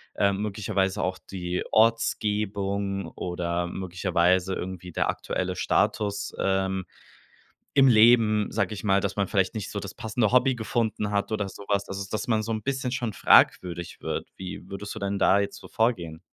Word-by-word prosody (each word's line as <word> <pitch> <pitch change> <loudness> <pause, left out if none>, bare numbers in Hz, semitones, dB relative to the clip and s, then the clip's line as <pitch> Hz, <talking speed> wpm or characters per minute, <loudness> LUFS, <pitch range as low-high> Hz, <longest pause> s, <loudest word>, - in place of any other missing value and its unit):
ähm, 100 0 +1
möglicherweise 100 -2 -1
auch 95 0 -1
die 90 -1 -4
Ortsgebung 100 -3 +1
oder 90 0 -2
möglicherweise 90 0 +1
irgendwie 90 -1 -6
der - - 0
aktuelle 90 0 -2
Status, 100 +2 0
ähm 95 -1 0 0.9
im 135 -1 +7
Leben“, 110 -2 +5
sag - - 0
ich 105 - -7
mal, 100 -2 +3
dass 100 -1 -2
man 100 -2 0
vielleicht 95 0 +1
nicht 105 -2 -4
so 100 - -3
das 100 0 -7
passende 110 -1 0
Hobby 125 0 +4
gefunden 110 -2 -1
hat 100 +1 -1
oder 105 -2 -1
so 100 - -11
was, 100 -1 +1
also 100 0 -4
dass 110 +1 -3
man 110 -2 +1
so 115 - -4
'n 110 -1 -3
bisschen 135 -1 -2
schon 120 -3 -2
fragwürdig 85 -3 +3
wird. - - -3
Wie 95 0 -8
würdest 100 +1 -6
du 110 - -6
denn 100 0 -2
da 100 - +5
jetzt 100 - -2
so - - -13
vorgehen? 90 -8 -1
100 Hz, 175 wpm, -26 LUFS, 95-110 Hz, 0.9 s, im